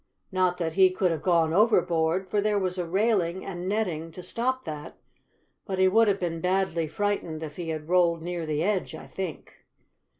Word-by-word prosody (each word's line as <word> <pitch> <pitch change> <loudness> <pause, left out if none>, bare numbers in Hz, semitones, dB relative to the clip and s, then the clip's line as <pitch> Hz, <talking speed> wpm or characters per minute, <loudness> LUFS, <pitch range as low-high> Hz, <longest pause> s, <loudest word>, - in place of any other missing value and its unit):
Not 185 -1 +1
that 165 -3 -2
he 190 0 +6
could 185 -1 0
have 160 -3 -2
gone 165 -1 +2
overboard, 180 -4 +2
for 205 +2 0
there 210 0 +1
was 185 -1 -1
a 175 - -2
railing 190 -2 +1
and 180 -1 -4
netting 180 -7 -1
to 180 - -8
stop 255 +5 -1
that, 150 -3 -7 0.7
but 190 -2 -2
he 190 0 +5
would 225 +4 +4
have 200 -1 +2
been 165 -2 -3
badly 180 -3 0
frightened 175 -4 -2
if 150 -1 -7
he 170 -2 -4
had 155 -1 -4
rolled 170 -2 +3
near 175 -2 -4
the 155 +1 0
edge, 200 -1 -1
I - - -9
think. 185 -5 -7
180 Hz, 195 wpm, -27 LUFS, 165-195 Hz, 0.7 s, he